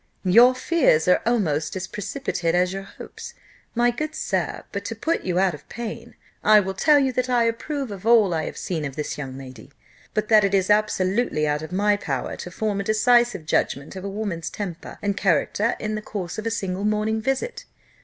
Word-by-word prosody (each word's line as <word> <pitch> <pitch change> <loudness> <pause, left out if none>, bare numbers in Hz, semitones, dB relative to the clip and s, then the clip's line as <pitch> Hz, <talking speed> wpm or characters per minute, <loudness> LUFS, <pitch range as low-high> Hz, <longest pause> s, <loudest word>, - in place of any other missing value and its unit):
"Your 240 +7 +7
fears 255 - +2
are 180 - +4
almost 160 -11 0
as 190 -1 -3
precipitate 185 - -2
as 180 +1 +2
your 195 - -4
hopes, 195 - -10 0.4
my 240 +1 +3
good 305 +5 -4
sir: - - -2
but - - -4
to - - -4
put 330 +1 -1
you 180 -1 -2
out 190 -1 +3
of 150 - -12
pain, 235 -2 -7 0.3
I 215 0 +7
will 190 -1 -2
tell 295 +10 +4
you, 265 -2 +2
that 255 +1 -1
I 245 -2 +3
approve 245 +3 -2
of 195 -2 -8
all 220 -5 +5
I 160 -1 -1
have - - -6
seen 165 -4 -3
of 140 -2 -5
this 150 -1 -4
young 135 -2 -6
lady, 130 -2 -11 0.5
but 215 0 0
that 215 -2 +6
it 200 0 +2
is 190 +1 +2
absolutely 200 -5 +1
out 150 0 0
of 155 - -8
my 205 +2 +2
power 135 -10 -3
to - - -7
form 205 +2 -2
a - - -1
decisive 235 -3 +3
judgment 140 0 -1
of 190 - -7
a 200 - -3
woman's 195 -5 -4
temper 185 -6 -6
and 200 -1 0
character 200 +4 +1
in 215 0 -3
the 215 - -3
course 200 -3 -5
of 215 - -4
a - - +2
single 195 -4 -3
morning 215 +1 0
visit. 270 - -2
205 Hz, 210 wpm, -23 LUFS, 180-230 Hz, 0.5 s, Your